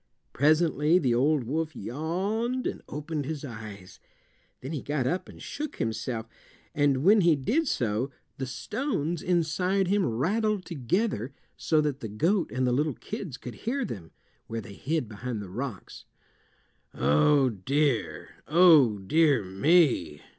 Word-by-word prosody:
Presently 155 +2 +3
the 130 -9 +2
old 140 +3 +2
wolf 155 +5 -2
yawned 195 - -2
and - - -3
opened 150 0 -4
his 150 0 -4
eyes. 105 -6 -9 0.6
Then 130 - -6
he 150 -5 -3
got 145 -3 -2
up 175 +8 -2
and - - -13
shook 300 0 -5
himself, 115 0 -3 0.5
and 145 -3 +2
when 205 +4 +6
he 170 -3 +5
did 250 - 0
so 120 - 0 0.3
the 135 - -3
stones 165 - -2
inside 180 +2 +1
him 200 0 +2
rattled 195 - 0
together 140 - -1 0.2
so 155 -2 +2
that 145 -2 -2
the 115 - -5
goat 165 - +1
and 130 0 0
the 125 - +2
little 145 +2 0
kids 190 - -6
could 125 - -8
hear 260 +3 -2
them, 90 - -7 0.4
where 115 - -4
they 100 -2 -9
hid 150 +4 -2
behind 110 +2 -5
the 100 -3 -8
rocks. 120 -2 -6 0.9
"Oh, 75 - +4
dear! 130 +5 -1 0.2
Oh, 155 - +6
dear 140 +4 +3
me!" 95 - +2
145 Hz, 145 wpm, -27 LUFS, 120-175 Hz, 0.9 s, when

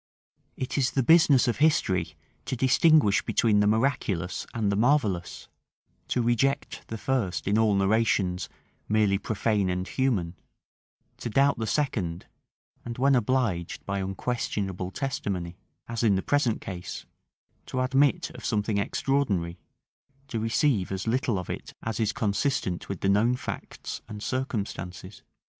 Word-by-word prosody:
It 130 +2 -2
is 130 -1 +2
the 135 - 0
business 145 -3 +5
of 120 - 0
history 95 - +2 0.3
to - - -2
distinguish 130 -3 +4
between 110 -3 +2
the 105 - +3
miraculous 110 -6 0
and 110 -4 0
the - - +1
marvellous; 110 -7 +1 0.6
to 125 - 0
reject 120 +4 0
the 110 - -5
first 115 -8 -1
in 100 - +2
all 110 -2 +3
narrations 100 -2 +1 0.4
merely 105 -2 +3
profane 105 -2 0
and 90 +1 -2
human; 110 -11 0 0.8
to - - -5
doubt 135 +3 +3
the 110 - -2
second; 100 - -1 0.6
and 120 -1 -6
when 135 +2 +3
obliged 120 -8 0
by 100 0 -2
unquestionable 95 -2 -3
testimony, 95 -8 -3 0.3
as 115 -1 -3
in 110 -4 +4
the 95 - -1
present 145 -6 +1
case, 90 -2 -6 0.6
to 130 - -3
admit 135 +2 +2
of - - -11
something 105 -2 0
extraordinary, 100 -8 0 0.7
to 115 - -2
receive 115 -2 +1
as 95 -1 -3
little 120 -2 0
of 90 - -5
it - - -6
as 110 -1 -3
is 110 -2 +1
consistent 105 - -1
with 100 -3 -4
the 95 - +1
known 110 +5 +3
facts 125 - -6
and 105 0 -7
circumstances. 100 -7 -4
110 Hz, 140 wpm, -27 LUFS, 95-130 Hz, 0.8 s, business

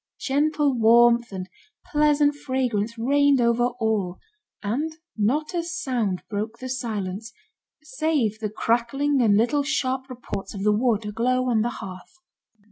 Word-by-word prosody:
Gentle 290 +1 +1
warmth 235 +1 +5
and 185 -1 -5 0.4
pleasant 295 -1 +3
fragrance 245 -6 -2
reigned 280 +3 +3
over 235 0 +3
all, 210 -5 0 0.5
and 290 +10 -2 0.2
not 270 - 0
a 345 - 0
sound 255 - -2
broke 215 +2 -4
the 255 +2 -7
silence, 220 -4 -4 0.5
save 275 -7 -1
the 215 -1 -2
crackling 245 +6 +1
and 210 -4 +4
little 245 +6 +2
sharp 265 -2 -1
reports 235 -6 -6
of 195 - -4
the 210 0 +4
wood 220 -1 +1
aglow 250 +4 0
on 220 -2 +3
the 235 - 0
hearth. 185 - -9
240 Hz, 135 wpm, -24 LUFS, 215-280 Hz, 0.5 s, warmth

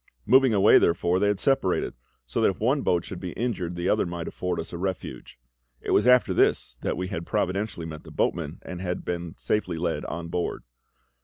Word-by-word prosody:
Moving 130 +1 +5
away, 105 0 +6
therefore, 85 +1 +2
they 105 - +2
had 100 -2 +1
separated, 135 -9 +1 0.3
so - - -2
that - - +5
if 95 - -4
one 130 +6 +2
boat 85 -6 +1
should 95 - -7
be 90 -2 -5
injured 95 -8 -2
the 85 +1 -2
other 105 -3 +2
might 85 -1 -5
afford 90 -1 -3
us 80 - -6
a - - -3
refuge. 95 -2 -5 0.4
It - - -4
was - - +4
after 125 0 +5
this 60 -1 +1
that - - -2
we 90 0 -3
had 85 -4 -4
providentially 95 0 -2
met 80 -1 -8
the - - -12
boatman, - - -1
and 90 -1 -7
had 90 -1 -3
been 85 -1 -4
safely 90 -6 -1
led 85 0 -1
on 85 0 -5
board. 90 0 -2
90 Hz, 210 wpm, -26 LUFS, 85-105 Hz, 0.4 s, away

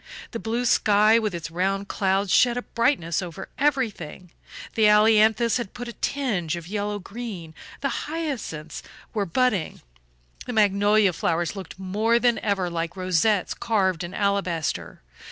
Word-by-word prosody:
The 230 - -4
blue 230 +3 -2
sky 215 0 +4
with 215 -5 -2
its 170 -1 -6
round 195 +3 -1
clouds 195 0 0
shed 245 -1 +4
a 245 - -3
brightness 230 - 0
over 180 +1 -7
everything; 215 - -1 0.4
the 220 -1 +4
ailanthus 220 +2 +4
had 240 -6 -6
put 245 - -6
on - - -5
a - - -19
tinge 200 - -1
of 170 -1 -8
yellow 205 +1 -2
green, 200 -5 -7 0.3
the 275 -3 -2
hyacinths 265 - -4 0.3
were 205 -3 -1
budding, 215 -2 0 0.7
the 245 - -3
magnolia 205 -1 +3
flowers 165 +1 -1
looked 190 -3 -8
more 210 +5 +1
than 240 -1 +2
ever 200 -4 0
like 170 +1 -4
rosettes 185 +2 +1
carved 190 -7 0
in 175 +2 -7
alabaster. 195 - -1
205 Hz, 150 wpm, -24 LUFS, 180-230 Hz, 0.7 s, sky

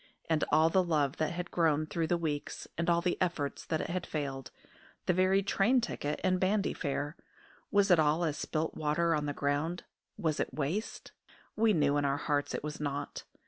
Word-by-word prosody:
And 160 -1 +1
all 160 +1 +5
the 190 - +4
love 150 -5 +1
that 155 - 0
had 180 +1 -5
grown 155 -3 +2
through 160 +1 -2
the 175 - +2
weeks, 150 -3 -3
and 170 +1 -1
all 170 0 +3
the 175 0 -1
efforts 165 -6 -1
that 160 -1 0
had 180 +1 -3
failed, 135 -4 -4 0.6
the - - +3
very 185 +2 +3
train 210 +6 +3
ticket 150 -10 -3
and 185 -1 +2
bandy 200 +2 +1
fare 145 0 -3 0.5
was 200 -1 +3
it 175 - +6
all 155 +2 +3
as 150 -2 -1
water 160 0 0
spilt - - -9 0.4
on 150 - -3
the 145 - -1
ground? 145 +5 -1 0.3
Was 160 -3 -1
it - - -2
waste? 160 +10 -3 0.4
We 220 0 +4
knew 145 -4 +3
in 145 - +1
our 140 0 +1
hearts 145 0 -1
it - - -4
was 150 0 -5
not. 145 -1 -4
160 Hz, 195 wpm, -31 LUFS, 145-180 Hz, 0.6 s, it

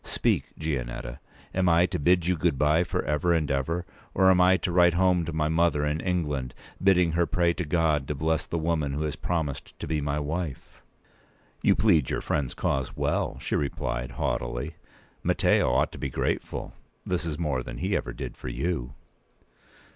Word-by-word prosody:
Speak, - - 0
Gianetta; 60 -6 -4 0.3
am 90 -1 +2
I 85 +1 +5
to 90 -1 -3
bid 85 +3 +3
you 90 +1 +2
good 80 -3 +1
bye 75 +4 +3
for 85 - -2
ever 75 +4 +1
and 75 -3 0
ever, 80 +6 -1 0.3
or 95 -1 +6
am 90 -1 +4
I 95 +1 +5
to 90 - -2
write 85 -1 +5
home 90 -2 +3
to 85 - -4
my 75 -1 0
mother 80 -2 +2
in 75 +2 -1
England, 75 -9 -2 0.3
bidding 90 -3 +4
her 85 +1 +1
pray 85 -1 +2
to 90 - -3
God 75 -3 +1
to 75 - -2
bless 80 +2 0
the 85 - -2
woman 80 -3 0
who 75 +2 -2
has 75 -2 -2
promised 80 -6 -3
to - - -4
be 75 0 -1
my 70 +1 -1
wife?" 75 -1 -5 0.8
"You - - +4
plead 85 - +3
your - - -1
friend's 70 -3 -1
cause 65 -1 -1
well," - - 0
she - - -2
p. - - +1
197replied, 60 -1 -4
haughtily. - - -2 0.5
"Matteo - - +3
ought - - +2
to - - -10
be 70 - -2
grateful. - - -2 0.3
This 90 -1 -1
is 80 -3 -3
more 75 -6 -1
than - - -7
he 95 +5 -1
ever - - -2
did - - -6
for - - -9
you." 70 -7 -3
80 Hz, 190 wpm, -27 LUFS, 70-85 Hz, 0.8 s, or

